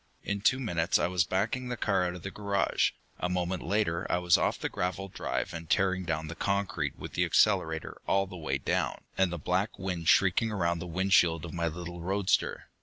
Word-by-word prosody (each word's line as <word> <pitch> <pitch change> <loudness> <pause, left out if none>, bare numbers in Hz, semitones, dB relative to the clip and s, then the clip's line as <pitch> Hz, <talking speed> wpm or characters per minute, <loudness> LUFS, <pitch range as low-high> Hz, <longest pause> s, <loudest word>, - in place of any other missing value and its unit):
In 100 0 -2
two 130 +5 +3
minutes 85 -8 +1
I - - +1
was 90 -1 +2
backing 110 +8 -1
the 125 - -3
car 95 -5 +1
out 90 - -4
of 90 - -10
the 95 - -5
garage; 100 -1 +1 0.3
a 90 - -1
moment 90 0 -1
later 90 -2 0
I - - +3
was 90 -1 +4
off - - +1
the - - -2
gravelled 95 +1 -3
drive - - -2
and 80 -1 -7
tearing 95 -1 +2
down 80 -2 -1
the 80 - -6
concrete 95 -7 -1
with - - -8
the - - +1
accelerator 80 0 +2
all 95 0 +3
the 95 - -10
way 75 -5 -2
down, 70 - -1
and 95 -2 +2
the 85 - -3
black 90 +6 -1
wind 90 -4 -3
shrieking 100 +4 +4
around 85 -4 0
the 90 - -6
windshield 85 -2 +3
of 85 - -8
my 85 -1 -1
little 85 +1 -6
roadster. 95 +2 0
90 Hz, 210 wpm, -29 LUFS, 85-95 Hz, 0.3 s, was